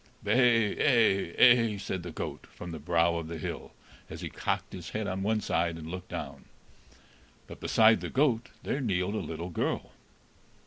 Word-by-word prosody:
"Bay 115 -4 +3
ay 110 - +3
ay," 115 -4 +6
said 95 -2 -4
the 85 - -7
goat, 80 - -6
from 90 - -9
the 80 - -6
brow 85 +2 +2
of 85 -1 -5
the 85 0 -5
hill, 75 - -6 0.4
as - - -8
he - - -5
cocked - - -3
his 85 -3 -7
head 110 0 -3
on 95 0 -3
one 110 +2 +1
side 85 -3 0
and 80 0 -8
looked 90 0 -7
down. - - -6 1.0
But - - -11
beside 110 0 +4
the - - -4
goat 125 -4 +1
there 140 - -2
kneeled 95 -4 0
a 110 - -1
little 85 +2 -5
girl. - - -2
95 Hz, 180 wpm, -29 LUFS, 85-115 Hz, 1.0 s, ay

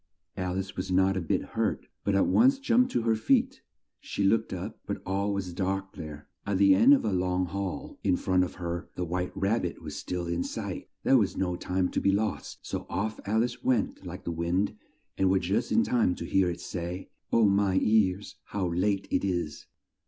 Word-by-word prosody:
Al 90 -1 -2
ice 95 0 -4
was 90 +1 -4
not 95 +1 +3
a 95 - -1
bit 80 - 0
hurt, - - -2 0.2
but 100 - +1
at 95 - +4
once 265 +4 +5
jumped 255 -2 +3
to 115 - 0
her 115 -1 +3
feet. 265 - +1 0.4
She 100 - -3
looked 110 +3 +2
up, - - -5
but - - -3
all 100 +2 0
was 95 -3 -3
dark 95 +1 -2
there. 75 -2 -8 0.2
At 100 -1 -1
the 100 0 +6
end 115 +9 +7
of 135 - -2
a 105 - 0
long 90 0 +1
hall 95 +1 -5
in 90 - +3
front 90 -1 +2
of 90 - -4
her 85 -1 -4
the 90 - -2
white 90 +2 -2
rab 100 +4 +1
bit - - -4
was - - -7
still 90 -1 -3
in 85 0 -1
sight. - - -5
There 135 - +5
was 100 - 0
no 90 -2 0
time 90 +1 -1
to - - -1
be 100 - +3
lost, 105 +2 -2
so - - -5
off 110 +2 -2
Al 110 +2 +3
ice 125 0 -4
went 120 -6 0
like 90 +1 -7
the 85 - -3
wind, 85 +4 0 0.4
and 95 -1 +4
was 95 0 +3
just 100 +7 0
in 230 - +4
time 115 - +2
to - - -6
hear 95 -2 +2
it 85 - -5
say, 90 +1 -5 0.2
"Oh, 115 -1 +5
my 100 -1 +2
ears, 105 -2 +1
how 95 -3 -2
late 95 +3 0
it - - +1
is!" 85 -5 -2
95 Hz, 215 wpm, -28 LUFS, 90-105 Hz, 0.4 s, end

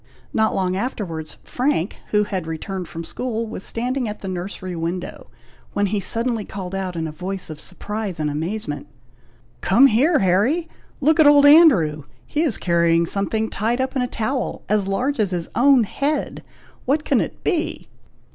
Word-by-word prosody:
Not 220 0 +2
long 185 -1 0
afterwards, 185 -8 -4
Frank, 250 - -1
who 210 0 +2
had 190 -5 -4
returned 180 +3 -5
from 165 - -7
school, 230 +4 -3
was 220 -3 -7
standing 250 +1 -2
at 210 - -7
the 195 - -6
nursery 185 0 -5
window, 170 +2 -5 0.4
when 205 - +1
he 205 +1 0
suddenly 230 +2 -1
called 190 -2 -7
out 190 -2 -3
in 165 -1 -2
a - - -5
voice 185 +2 -6
of 150 - -8
surprise 205 -1 -5
and 155 - 0
amazement, 150 0 -4 0.7
"Come 235 +9 +5
here, 275 +7 +4
Harry! 215 - +2 0.3
look 310 +3 +3
at 310 - +7
old 290 -1 +7
Andrew! 215 - +6 0.2
he 300 - -1
is 295 -10 +1
carrying 170 -1 +2
something 205 +5 -1
tied 225 +4 -1
up 260 +1 -1
in 260 - +1
a 250 - 0
towel, 245 +3 -3
as 205 -2 +1
large 250 +8 -1
as 210 -3 +2
his 175 -2 -3
own 265 -1 +5
head! 280 +8 -2 0.4
what 295 +4 +1
can - - +3
it - - -6
be?" 330 -3 -1
210 Hz, 175 wpm, -21 LUFS, 180-255 Hz, 0.7 s, at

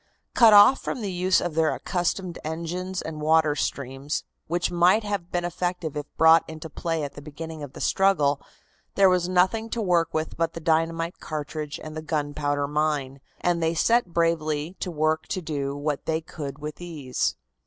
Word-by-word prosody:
Cut 230 -3 +7
off 205 +6 +8
from 255 - -4
the 200 -3 -3
use 185 +1 +2
of 175 - -3
their 160 0 +2
accustomed 175 0 -2
engines 175 +4 -4
and 155 -1 -6
water 155 -1 +3
streams, 140 0 -3 0.2
which 175 +2 0
might 175 +5 +4
have 200 -4 -3
been 175 0 -1
effective 175 -2 -3
if 150 0 -4
brought 160 +1 +7
into 160 0 -8
play 165 -1 -2
at 140 -1 -5
the 145 - -10
beginning 160 +2 -8
of 140 -2 -8
the - - -9
struggle, 150 -8 +2 0.5
there 195 -2 +6
was 180 -1 +1
nothing 190 +5 +2
to 235 - -3
work 175 -5 +2
with 155 0 -3
but 165 0 0
the - - -6
dynamite 165 +1 0
cartridge 150 -1 -5
and 155 0 -8
the 155 - -4
gunpowder 145 -2 -1
mine, 145 -3 -1 0.2
and 175 -1 +1
they 165 +1 +1
set 235 +6 +3
bravely 165 -1 0
to - - -3
work 155 -1 0
to - - -2
do 145 -4 -3
what 145 0 -3
they 160 0 +1
could 145 -4 -7
with 150 0 -6
these. 155 -8 -2
160 Hz, 185 wpm, -25 LUFS, 150-175 Hz, 0.5 s, off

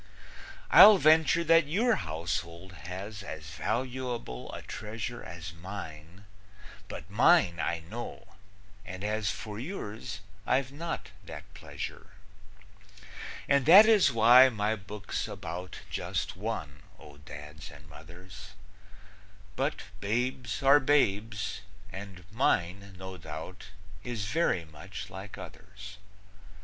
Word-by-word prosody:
I'll 210 -1 +10
venture 160 0 +4
that 165 -2 +5
your 220 +10 +2
household 85 +2 -4
has 95 +6 -7
As 80 -5 -8
valuable 120 - -3
a - - -8
treasure 110 +3 -6
As 85 -1 -8
mine, 85 0 -9 0.6
but - - -8
mine 85 -1 +4
I 85 0 -1
know, 110 +9 -8 0.5
and 95 +1 -8
as 105 -1 -1
For 105 +3 -5
yours, 110 - -6 0.3
I've 130 0 +1
not 165 +4 -5
that - - -8
pleasure. 95 -3 -8 1.3
And 140 -1 +3
that 195 +6 +10
is 215 -9 +5
why 120 +3 +8
my 110 -2 -1
book's 105 0 -5
about 90 +2 -7
Just - - -3
one, 85 -9 -5 0.2
O 75 -1 -14
Dads 75 +3 -10
and 75 -1 -14
Mothers; 85 +5 -13 1.0
But - - -1 0.2
babes 120 +3 -2
are 140 +2 +7
babes, 110 -7 +1 0.3
and 95 -1 -9
mine, 100 -4 0
no 95 0 -8
doubt, 80 +3 -8 0.4
Is 115 -5 -4
very 105 - +1
much 85 +6 -9
like 100 +2 -8
others. 100 0 -11
100 Hz, 115 wpm, -29 LUFS, 85-125 Hz, 1.3 s, I'll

